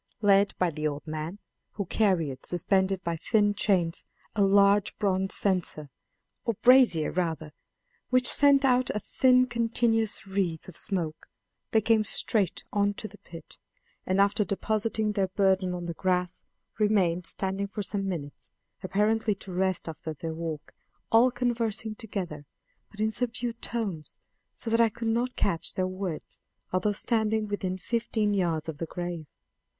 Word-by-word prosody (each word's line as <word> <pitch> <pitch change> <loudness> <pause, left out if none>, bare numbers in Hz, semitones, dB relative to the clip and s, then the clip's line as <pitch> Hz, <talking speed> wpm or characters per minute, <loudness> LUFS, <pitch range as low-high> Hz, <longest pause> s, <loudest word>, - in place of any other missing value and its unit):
Led 200 0 +4
by 180 -2 +1
the 155 0 -2
old 145 -1 -5
man 155 +4 -5 0.4
who 200 - -3
carried, 170 -10 0
suspended 190 +2 +1
by 170 -1 -1
thin 205 +3 +2
chains, 185 -5 0 0.3
a 205 - +1
large 200 0 +4
bronze 190 -2 0
censer, 175 -7 -1 0.5
or 230 - -1
brazier 245 -11 +5
rather, 160 -3 -2 0.6
which 255 0 +3
sent 280 -1 +6
out 255 -1 +3
a - - 0
thin 255 +3 +3
continuous 230 -3 0
wreath 190 -5 -2
of 185 - -11
smoke 165 -6 -3 0.4
they 220 - +3
came 220 0 +3
straight 205 -2 0
on 205 0 +1
to 215 - -6
the 210 0 -16
pit; 165 -2 -12 0.4
and 185 +1 0
after 200 +1 +3
depositing 215 +1 -1
their 200 -2 0
burden 190 -1 +1
on 175 -1 -4
the 170 - -3
grass, 180 0 -1 0.4
remained 185 -5 +2
standing 195 +1 -2
for 205 +1 -5
some 195 0 -2
minutes, 145 -6 -6 0.3
apparently 210 +3 +1
to 190 -1 -9
rest 185 -1 0
after 160 0 -6
their 160 +2 -5
walk, 160 -2 -6 0.4
all 230 +3 +6
conversing 230 -3 -1
together, 180 -10 -6 0.4
but 210 - -17
in 215 0 +1
subdued 235 0 -3
tones, 195 -10 -4 0.4
so 225 - -5
that 230 +1 +4
I 230 - +5
could 230 +1 -4
not 240 +3 0
catch 170 -4 -1
their 185 - 0
words, 185 -3 -5 0.3
although 185 +3 +2
standing 220 0 0
within 190 -2 -3
fifteen 220 +1 -1
yards 170 -5 0
of 160 -2 -6
the 165 - -3
grave. 175 -2 -5
200 Hz, 155 wpm, -28 LUFS, 175-220 Hz, 0.6 s, sent